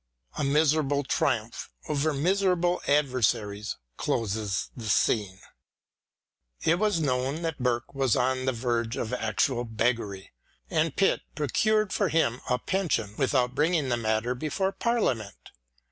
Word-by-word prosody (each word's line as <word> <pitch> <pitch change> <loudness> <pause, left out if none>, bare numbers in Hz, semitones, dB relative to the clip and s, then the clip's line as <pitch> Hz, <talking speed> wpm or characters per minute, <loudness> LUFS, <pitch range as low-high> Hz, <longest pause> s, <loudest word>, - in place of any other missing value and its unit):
A 150 - -2
miserable 145 0 +2
triumph 130 -6 -1 0.2
over 150 +1 +1
miserable 180 +3 +1
adver 140 -3 +2
saries 105 -2 0 0.2
closes 105 -3 -1
the 115 -4 -6
scene. 100 -2 +1 1.2
It 170 +2 +3
was 210 -5 +2
known 135 +2 -1
that 165 -3 -3
Burke 120 +1 -1
was 135 -4 +2
on 130 +1 +1
the 130 - +2
verge 120 -1 -1
of 110 - -3
actual 120 +2 0
beggary, 110 -4 -2 0.4
and 160 -1 +1
Pitt 195 - +2
pro 150 - -1
cured 215 - +2
for 200 -4 +1
him 145 -6 +1
a 125 - +2
pension 125 - -1
without 130 -2 +2
bringing 150 -1 +1
the 120 - +2
matter 110 +1 0
before 155 +8 -1
Parliament. 165 - -1
130 Hz, 135 wpm, -27 LUFS, 115-160 Hz, 1.2 s, It